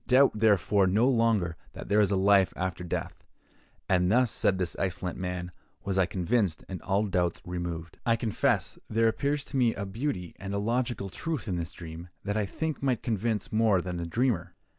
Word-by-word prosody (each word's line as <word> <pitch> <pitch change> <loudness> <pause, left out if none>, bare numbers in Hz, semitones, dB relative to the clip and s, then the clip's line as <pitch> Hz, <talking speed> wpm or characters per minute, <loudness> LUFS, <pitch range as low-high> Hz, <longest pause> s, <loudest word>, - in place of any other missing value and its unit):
Doubt, 130 +2 +6
therefore, 105 -2 +3
no 105 +7 +3
longer 115 -9 +2 0.2
that - - -8
there 105 +1 +4
is 100 - +3
a 100 - +2
life 95 0 +4
after 95 -1 -3
death.' 90 - -4 0.6
And 90 -1 +3
thus," 125 0 +3
said 95 - +1
this 90 -2 -2
excellent 90 -1 -2
man, 90 -1 -4 0.3
"was 95 -1 0
I 95 - +3
convinced, 95 0 0
and 95 -2 -6
all 100 +2 +1
doubts 90 -3 0
removed." 85 -2 -5
I 115 -2 +3
confess 115 -2 0
there 115 +1 +3
appears 140 +5 0
to 140 - -4
me 120 -3 +3
a 100 - -3
beauty 95 - -3
and 100 +1 -4
a - - 0
logical 115 -1 -1
truth 155 - -4
in 95 - -1
this 85 0 -4
dream 85 0 -9
that 100 +1 -2
I 105 -2 0
think 160 +6 -3
might 130 -5 0
convince 110 -1 -1
more 110 -3 +4
than 90 0 -4
the 85 -1 -3
dreamer. 115 -1 0
100 Hz, 195 wpm, -28 LUFS, 90-115 Hz, 0.6 s, Doubt